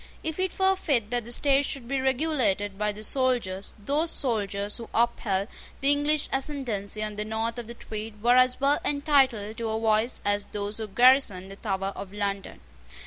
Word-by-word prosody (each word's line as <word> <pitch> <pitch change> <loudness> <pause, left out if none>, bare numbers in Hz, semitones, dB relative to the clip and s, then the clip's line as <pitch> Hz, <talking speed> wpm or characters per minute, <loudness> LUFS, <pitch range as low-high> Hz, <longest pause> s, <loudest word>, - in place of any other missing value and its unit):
If 320 +2 -4
it 375 -1 -1
were 385 0 +3
fit 250 - 0
that 240 -2 -1
the 240 - -6
state 275 +2 +4
should 270 -4 -4
be 270 +1 -1
regulated 260 -8 0
by 210 +1 0
the 210 +1 -9
soldiers, 235 -7 0
those 290 +10 0
soldiers 205 -7 -1
who 230 - -9
upheld 215 -4 +1 0.3
the 275 +1 +4
English 290 +1 +1
ascendency 240 -7 -2
on 210 -1 -5
the 210 - -1
north 225 +2 -3
of 235 - -7
the 235 - -8
Tweed 215 -1 -7
were 240 +1 +5
as 255 0 +4
well 280 +3 +3
entitled 270 - +1
to 230 -1 -3
a 220 0 -1
voice 220 +2 +2
as 205 0 +1
those 205 0 -4
who 220 -1 -4
garrisoned 210 -4 +3
the - - -8
Tower 195 -2 -3
of 195 -1 -7
London. 200 - -4
230 Hz, 190 wpm, -27 LUFS, 205-270 Hz, 0.3 s, were